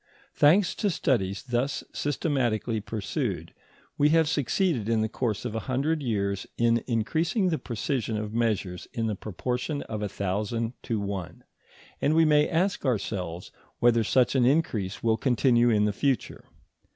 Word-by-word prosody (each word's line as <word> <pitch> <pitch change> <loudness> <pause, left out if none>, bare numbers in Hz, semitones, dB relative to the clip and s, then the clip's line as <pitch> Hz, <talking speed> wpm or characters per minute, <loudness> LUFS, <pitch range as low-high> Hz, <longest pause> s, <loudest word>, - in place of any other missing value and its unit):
] - - -28
Thanks 170 +6 +4
to 205 - +1
studies 105 - 0
thus 125 +2 -1
systematically 125 -7 -1
pursued, 105 -1 -3 0.5
we 145 +1 +5
have 160 0 +4
succeeded 145 - 0
in 115 -1 +2
the - - +1
course 115 -1 -2
of 120 - -3
a 115 - -1
hundred 145 +5 0
years 100 -6 -1
in 115 -1 +2
increasing 160 - +1
the 160 - -1
precision 115 -1 -2
of 105 0 -4
measures 105 -6 -1
in 115 - -1
the 110 - 0
proportion 125 - -3
of 110 -2 -5
a 105 - -2
thousand 105 +5 -2
to 115 -4 -2
one, 100 -4 -5 0.6
and 150 - +2
we 165 0 +5
may 150 -1 +4
ask 180 +3 0
ourselves 95 - -2 0.3
whether 120 -1 +4
such 125 +2 +3
an 130 -2 +3
increase 120 - +1
will 110 -1 +2
continue 120 -1 +3
in 105 -2 +3
the 105 - 0
future. 135 +1 -1
120 Hz, 160 wpm, -27 LUFS, 105-145 Hz, 0.6 s, we